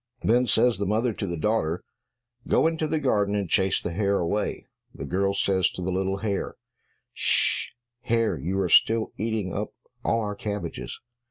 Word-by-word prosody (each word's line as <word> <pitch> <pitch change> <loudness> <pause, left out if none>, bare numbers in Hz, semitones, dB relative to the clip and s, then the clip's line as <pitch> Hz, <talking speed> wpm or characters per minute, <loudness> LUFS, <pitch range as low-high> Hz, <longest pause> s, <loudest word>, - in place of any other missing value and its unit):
Then 125 +2 +3
says 115 -1 +3
the 100 - -1
mother 110 +3 +1
to 100 - -4
the 85 -1 -3
daughter, 85 -2 0 0.6
"Go - - +3
into 160 -1 +1
the 155 +1 0
garden, 105 -7 +1
and 100 -2 -1
chase 95 +3 +2
the 85 - -4
hare 100 +2 +1
away." 95 +5 -1 0.3
The - - -6
girl 100 +2 0
says 95 -2 +2
to 90 - -5
the 95 - -1
little 95 +1 0
hare, 100 -1 -2 0.6
"Sh - - +1
sh, - - -16 0.4
hare, 115 -4 +2
you 90 +7 -2
are 95 - +1
still 110 +6 +4
eating 110 -3 -2
up 105 +2 -4 0.3
all 115 - +1
our 105 -1 -2
cabbages." 100 - -5
100 Hz, 180 wpm, -26 LUFS, 95-110 Hz, 0.6 s, still